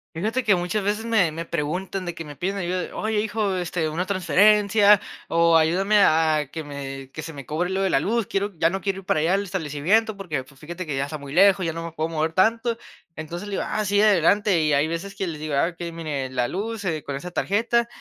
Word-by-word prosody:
Fíjate 220 +9 -1
que, 210 -4 +4
muchas 180 +4 -2
veces 210 +3 -1
me 215 -8 +2
me 165 +2 -5
preguntan 180 +5 -3
de 175 - -4
que 165 - -8
me 145 -1 -9
piden 190 +8 -2
ayuda, 180 -1 -3
"Oye, 215 -1 0
hijo, 210 -2 -1
este, 175 -2 -2
una 165 +4 -2
transferencia" 205 +2 +4 0.3
o 170 0 +4
"Ayúdame 185 +6 +3
a 160 -4 +4
a 150 -1 -1
que 155 +2 -7
me 135 -2 -7
que 155 - -6
se 160 +1 -7
me 140 -3 -9
cobre 165 +6 -2
lo 190 +1 -1
de 195 - +1
la 135 - +2
luz, 225 +4 0
quiero 200 +1 -1
ya 165 - +4
no 190 +2 -3
quiero 195 +1 -2
ir 195 - -14
para 155 - +1
allá 170 +4 +2
al 200 - 0
establecimiento, 190 +4 0
porque 155 -9 -4
pues, 135 +1 -20
fíjate 175 +5 -7
que, 145 -4 -3
ya 135 - 0
está 155 +2 -6
muy 140 -1 -10
lejos, 190 +1 +5
ya 165 - 0
no 165 +1 -6
me 170 - -7
puedo 160 0 -2
mover 160 0 -1
tanto". 225 +5 +2 0.4
Entonces, 170 +5 -6
le 205 - -6
digo: - - -1
"Ah, 215 - -2
sí, 205 +1 +2
adelante", 205 -1 +4
y 155 -1 +2
hay 140 +1 +3
veces 170 +4 -5
que 195 -2 -3
les 160 -3 -5
digo: 155 -1 -4
"Ah, 140 +5 +2
okey, 170 0 -7
mire, 150 -5 -4
la 125 -1 -1
luz, 215 +3 -4
eh, 160 -5 -2
con 140 - -4
esa 175 +6 -6
tarjeta, 230 +6 +1
175 Hz, 250 wpm, -23 LUFS, 155-200 Hz, 0.4 s, lejos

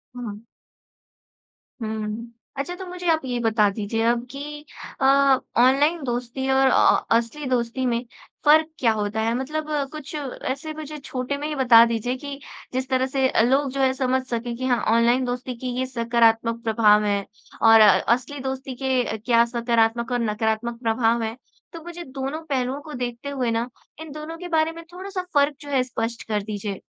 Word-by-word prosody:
हुँ। 215 -4 -6 1.4
हुँ, 220 +1 -4 0.3
अच्छा 280 +6 -3
तो 375 +1 -8
मुझे 360 0 -6
आप 320 -1 +1
ये 245 -2 -2
बता 220 -2 +3
दीजिए 210 +2 -3
अब 235 +1 +1
की 275 - -7 0.6
अ, - - +3 0.6
ऑनलाइन 290 +6 +3
दोस्ती 245 +1 -3
और 265 0 +4
अ, 260 - +4
असली 235 +6 -4
दोस्ती 250 +1 -1
में 235 -1 0 0.4
फ़र्क़ 310 +1 +6
क्या 235 -3 +3
होता 210 0 -2
है? 225 +1 +1
मतलब 305 +4 -3
अ, 295 -2 +1
कुछ 305 -1 -8
ऐसे 280 +1 -4
मुझे 305 -1 -7
छोटे 270 -1 -4
में 295 +1 -4
ही 305 - -3
बता 240 -4 +7
दीजिए 235 +2 -1
कि 280 +1 -7 0.3
जिस 260 +1 -2
तरह 260 -1 +2
से 265 0 +1 0.2
लोग 275 +1 +2
जो 275 +1 -2
है 260 -1 +3
समझ 260 0 0
सकें 235 -1 -3
कि 255 - -3
हाँ 245 -2 +2 0.2
ऑनलाइन 240 +2 +3
दोस्ती 250 0 -4
की 255 +1 -4
ये 260 - 0
सकारात्मक 230 -1 +1
प्रभाव 215 -2 +4
हैं 200 -1 0 0.4
और 225 0 +8
अ, 215 - +9 0.3
असली 255 +4 -4
दोस्ती 265 0 -5
के 255 -4 0
क्या 230 +2 +3
सकारात्मक 235 0 0
और 245 - +1
नकारात्मक 220 +1 -1
प्रभाव 230 0 +1
है। 220 0 -3 0.4
तो 330 -1 -9
मुझे 345 0 -8
दोनों 270 +2 -5
पहलू 265 -2 -1
को 305 - -8
देखते 245 +2 -4
हुए 260 -4 -1
ना 230 +2 -1 0.3
इन 320 -2 -8
दोनों 305 +2 -7
के 355 +1 -7
बारे 315 +1 +2
में 335 0 -10
थोड़ा 375 +2 -7
सा 385 -2 -3
फ़र्क 285 0 +3
जो 290 - -9
है 270 -3 +2
स्पष्ट 230 -1 -4
कर 210 -2 0
दीजिए? 205 -1 -5
250 Hz, 185 wpm, -23 LUFS, 230-280 Hz, 1.4 s, अ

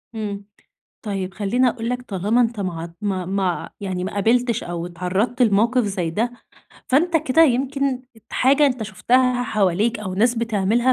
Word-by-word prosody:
إمم. 205 -2 -4 0.6
طيب، 195 -3 -3
خلّيني 245 +6 +1
أقول 230 0 -4
لك 250 0 -2
طالما 210 +2 0
أنت 230 -2 0
ما 175 -4 -3
ع 170 - -5
ما 190 -3 -2
ما 195 +1 -1
ع - - -6
يعني 185 -2 -3
ما 190 - -4
قابلتش 235 +3 +1
أو 170 0 -4
اتعرّضت 190 +8 -2
لموقف 230 +3 +3
زي 190 -5 -2
ده، 230 +8 -1 0.6
فأنت 325 +6 +3
كده 315 0 +3
يمكن 270 -1 +1 0.3
حاجة 280 +3 +4
أنت 250 -4 -1
شُفتها 245 +4 +1
حواليك 215 0 +1
أو 185 -3 -4
ناس 235 +5 +3
بتعملها 230 +2 +1
225 Hz, 165 wpm, -21 LUFS, 195-250 Hz, 0.6 s, حاجة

